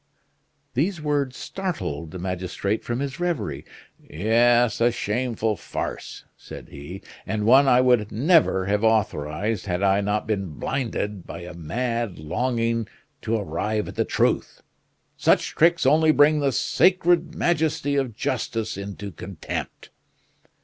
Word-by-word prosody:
These 170 +7 0
words 145 -4 -1
startled 90 - -4
the 90 - -8
magistrate 95 +3 -3
from 120 +2 -3
his 140 +3 -4
reverie. 145 - -2 0.3
"Yes, 120 +7 +2
a 120 +1 +4
shameful 110 -1 -1
farce," - - -6
said - - -11
he, 75 +7 -9 0.2
"and 105 -1 -2
one 135 +4 +6
I 125 -1 +6
would 125 -5 +3
never 135 - +3
have 105 +2 0
authorized, 100 -2 0
had 90 +1 -1
I 100 +1 +3
not 105 +1 -1
been 100 -6 -2
blinded 105 -7 -3
by - - -7
a 90 +1 -8
mad 115 +5 -3
longing 115 +7 -1 0.3
to 115 0 0
arrive 105 +3 -2
at - - -7
the - - +1
truth. - - 0 0.5
Such - - +3
tricks 170 -1 +3
only 155 +3 +5
bring 150 0 +5
the 140 -1 +1
sacred 175 +4 +2
majesty 160 -3 0
of 130 -6 -1
justice 115 -3 -2
into 100 0 -6
contempt!" 90 0 -7
115 Hz, 135 wpm, -24 LUFS, 100-135 Hz, 0.5 s, one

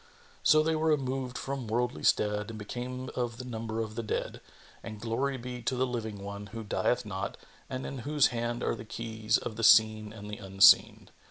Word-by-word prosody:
So 155 0 +5
they 160 0 +1
were 160 +1 0
removed 130 -3 -1
from 135 -3 -4
worldly 120 +3 -1
stead 105 0 +2
and 110 - -7
became 125 +4 -5
of 120 -2 -2
the 125 - -7
number 115 -2 -4
of 110 -1 -4
the 115 - -3
dead; 110 - -3 0.4
and 110 -2 -8
glory 130 +5 -1
be 125 0 -6
to 125 +3 -1
the 130 +1 +1
Living 110 -5 -4
One, 100 +1 -6
who 115 +3 -7
dieth 110 +2 0
not 100 -1 -4 0.3
and 130 0 -4
in 135 - -5
whose 145 +3 +3
hand 120 0 -2
are - - +1
the 110 - -7
keys 110 -1 -1
of 110 - -6
the 115 - -3
Seen 110 -1 +5
and 105 -2 -9
the 105 0 -6
Unseen! 95 0 +5
115 Hz, 200 wpm, -30 LUFS, 110-125 Hz, 0.4 s, So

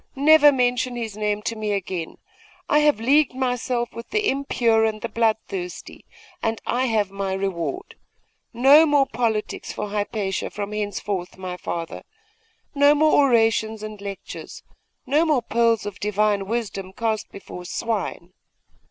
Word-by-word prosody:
never 295 +1 +7
mention 250 -1 0
his 225 -4 -4
name 210 0 -1
to 230 - -2
me 215 -1 -2
again! 185 -4 -4 0.5
I 300 - +4
have 295 -6 +3
leagued 275 +3 +3
myself 250 -1 -1
with 230 - -9
the 430 -1 +1
impure 235 -5 +1
and 220 -1 0
the 235 - -4
bloodthirsty, 215 -5 -3 0.4
and 225 0 -1
I 255 +2 0
have 215 -5 0
my 195 -1 -3
reward! 195 - -3 0.6
No 275 +7 +6
more 290 -2 +4
politics 225 -3 -2
for 210 - -5
Hypatia 205 -1 -2
from 205 0 -5
henceforth, 205 -3 -3
my 185 -1 -5
father; 170 -2 -5 0.7
no 285 0 +5
more 310 +1 +4 0.2
orations 225 -2 +2
and 215 -1 -7
lectures; 200 -1 -8 0.4
no 290 +5 +3
more 300 -7 +2
pearls 230 -1 +1
of 205 -2 -6
Divine 210 -1 0
wisdom 200 -4 -3
cast 220 -1 -2
before 180 -2 -9
swine. 190 -3 -3
220 Hz, 145 wpm, -23 LUFS, 200-250 Hz, 0.7 s, never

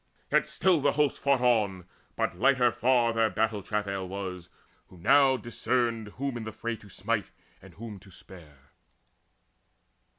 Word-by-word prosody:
Yet - - +3
still 180 -5 +2
the 145 0 +2
hosts 150 -1 +1
fought 140 -2 +2
on; 105 -7 +1 0.3
but - - -1
lighter 125 +4 +3
far 120 -1 +2
Their 115 -1 +2
battle 110 +1 -1
travail 100 -2 -3
was, 90 -2 -6 0.4
who 90 - -16
now 135 +7 +4
discerned 120 -2 -1
Whom 135 -2 -3
in 115 - -6
the 110 - -6
fray 115 +2 -4
to 105 - -16
smite, 105 +2 -2 0.3
and 95 -3 -15
whom 110 -1 -8
to 95 +1 -17
spare. 75 -8 -16
110 Hz, 155 wpm, -28 LUFS, 95-125 Hz, 0.4 s, now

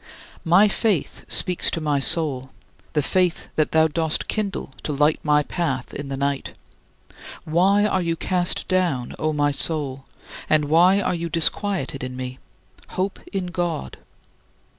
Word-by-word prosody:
My 180 +6 +5
faith 205 - -1
speaks 180 -2 +2
to - - -2
my 150 -3 0
soul 135 -3 0 0.4
the 150 - +1
faith 180 +2 0
that 155 - +1
thou 160 0 +4
dost 160 0 0
kindle 200 -10 -3
to - - -3
light 150 +2 +2
my 150 -1 +3
path 140 -7 -3
in 140 0 -6
the 135 - -3
night: 140 0 -2 0.9
"Why 190 +6 +3
are 190 -3 +1
you 165 -1 -1
cast 180 +1 0
down, 175 -10 0
O 155 - 0
my 145 -1 +1
soul, 140 -3 -1 0.4
and 155 -1 +3
why 175 +6 +5
are 185 - 0
you 170 -1 -3
disquieted 165 -4 0
in 130 0 -5
me? 130 0 -6 0.5
Hope 190 +1 -3
in 190 -2 -2
God." 170 - -3
160 Hz, 150 wpm, -23 LUFS, 140-180 Hz, 0.9 s, My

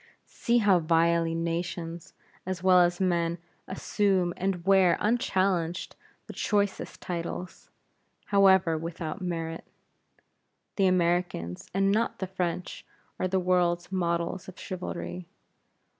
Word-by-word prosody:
See 240 0 0
how 200 -5 +4
vilely 165 0 +2
nations, 165 0 -4 0.3
as 185 -1 -4
well 185 -1 +6
as 175 0 +3
men, 170 -2 +1 0.3
assume 190 -2 0
and 185 -2 -2
wear 190 -2 +5
unchallenged 190 -6 0 0.3
the - - -9
choicest 205 -1 -1
titles, 175 +1 -5 0.6
however 190 -5 +4
without 165 +2 -5
merit. 165 -2 -4 1.1
The 195 -2 +4
Americans, 175 - 0
and 195 +1 +2
not 225 +3 0
the 190 - -3
French, 180 -1 -4 0.4
are 185 - +1
the 190 +1 +1
world's 180 -1 +1
models 170 0 -1
of 185 - -11
chivalry. 90 - -6
180 Hz, 115 wpm, -28 LUFS, 170-190 Hz, 1.1 s, well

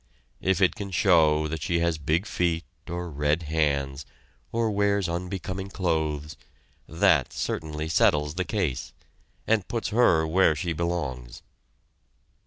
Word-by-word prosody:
If 95 0 +1
it 95 - +4
can 100 -2 -6
show 80 -5 +3
that 80 0 -4
she 85 +3 0
has 85 -2 0
big 80 +6 0
feet 85 -5 0 0.3
or 85 +1 -4
red 75 +3 0
hands, 70 -3 -1 0.4
or 115 -1 0
wears 100 -1 +1
unbecoming 95 +2 -4
clothes, 80 -5 -2 0.5
that - - +3
certainly 75 0 -3
settles 75 -2 +2
the 90 +2 -1
case 90 - -2 0.5
and 110 -4 +1
puts 115 -2 -2
her 105 -9 +4
where 80 0 +3
she 85 +3 -2
belongs. 75 -8 -4
85 Hz, 130 wpm, -26 LUFS, 75-95 Hz, 0.5 s, it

